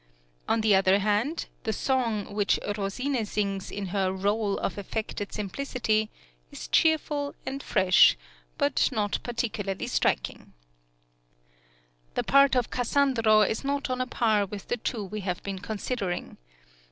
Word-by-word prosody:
On 225 0 +2
the 215 -1 +4
other 190 0 +5
hand, 210 +10 0 0.2
the 220 - -2
song 230 -2 0
(17) 205 - -11
which 205 -1 +2 0.2
Rosine 230 +6 -1
sings 200 -2 -2
in 200 -2 -5
her 195 -2 +1
rôle 200 +2 0
of 195 - -3
affected 205 0 -4
simplicity, 215 0 -1 0.4
is - - -8
cheerful 300 -3 +1
and 275 +1 -4
fresh, 185 -7 +5 0.4
but 140 - +2
not 210 -4 -1
particularly 215 -5 -3
striking. - - -1 1.6
The - - 0
part 275 -1 +5
of 245 -2 0
Cassandro 245 -4 +3
is 220 - -2
not 280 -1 -1
on 255 0 -1
a 255 - -1
par 215 -5 +1
with 200 0 -8
the 245 - 0
two 225 -1 -3
we 205 +2 -5
have 185 -3 -3
been 195 -1 -4
considering. 200 -1 -4
215 Hz, 140 wpm, -27 LUFS, 200-250 Hz, 1.6 s, other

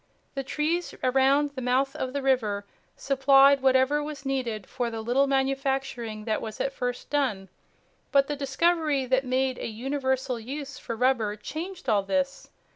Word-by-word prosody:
The 275 - -3
trees 310 +6 -1
around 270 +3 +3
the 270 -2 -6
mouth 265 +3 +1
of 260 -4 -3
the 280 0 -3
river 215 -7 +1 0.3
supplied 275 0 +5
whatever 265 +2 +3
was 295 -2 -7
needed 245 -7 -2
for 245 -2 -3
the 225 -1 -5
little 245 +5 +2
manufacturing 270 -5 -1
that 220 -2 -1
was 220 -1 -6
at 270 - -1
first 245 -1 -4
done. 235 -10 0 0.6
But 275 -1 +5
the 295 - -3
discovery 290 0 +1
that 260 +1 +1
made 260 0 0
a - - -3
universal 260 +2 -2
use 275 +3 -6
for 230 - -5
rubber 230 -4 +1
changed 335 - -7
all 210 -2 +3
this. 275 +7 -2
265 Hz, 160 wpm, -27 LUFS, 245-280 Hz, 0.6 s, supplied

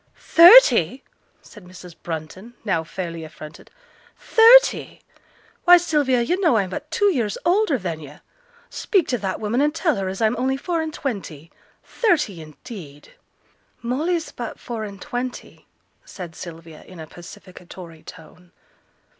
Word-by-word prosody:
'Thirty!' 295 - +6 0.4
said 210 - -15
Mrs. 180 -1 -13
Brunton, 175 +8 -8
now 175 -6 0
fairly 165 0 -7
affronted. 155 -1 -12 0.5
'Thirty! 475 +3 +4 0.6
why, 355 0 +8
Sylvia, 290 -8 0
yo' 350 +9 -1
know 330 - +2
I'm 190 -3 -1
but 295 +10 -7
two 400 +4 +1
years 225 - -2
older 355 -4 +2
than 175 -7 -5
yo'; 150 -1 -12 0.5
speak 385 -7 0
to 245 - -1
that 190 -2 -4
woman 225 +5 -1
an' 295 +1 +1
tell 325 -1 0
her 195 -1 -3
as 190 - -6
I'm 220 +1 +1
only 265 +2 -1
four 335 +4 -2
and 320 0 -4
twenty. 185 - -6 0.3
Thirty, 300 - -1
indeed!' 155 -1 -12 0.7
'Molly's 315 +8 -2
but 240 -2 -8
four 230 -3 -6
and 200 -1 -10
twenty,' 250 +2 -7 0.4
said 175 -4 -10
Sylvia, 165 -2 -11
in 185 -2 -14
a 160 - -8
pacificatory 175 0 -13
tone. 175 +1 -15
215 Hz, 140 wpm, -21 LUFS, -, 0.7 s, why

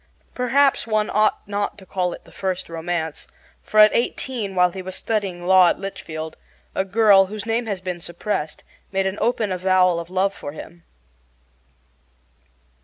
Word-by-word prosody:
Perhaps 260 +1 +2
one 215 -1 0
ought 215 -1 +1
not 205 0 -2
to 195 - -14
call 180 -1 -1
it - - -9
the - - -17
first 185 -3 -3
romance, 165 -1 -3 0.3
for 215 - 0
at 215 0 +7
eighteen, 235 -4 -2
while 180 -1 +4
he 190 - -6
was 185 0 -7
studying 190 -4 -2
law 185 -1 +7
at - - 0
Litchfield, 160 -5 -6 0.4
a - - 0
girl, 200 -1 +5
whose 210 +1 -6
name 230 +1 -1
has 200 -4 -3
been 180 -2 -4
suppressed, 170 -2 -4 0.3
made 195 0 0
an 190 +1 -2
open 225 -4 +1
avowal 185 -1 +3
of 170 0 -7
love 190 +2 +1
for 145 -7 -8
him. 170 +2 -11
190 Hz, 165 wpm, -22 LUFS, 180-215 Hz, 0.4 s, at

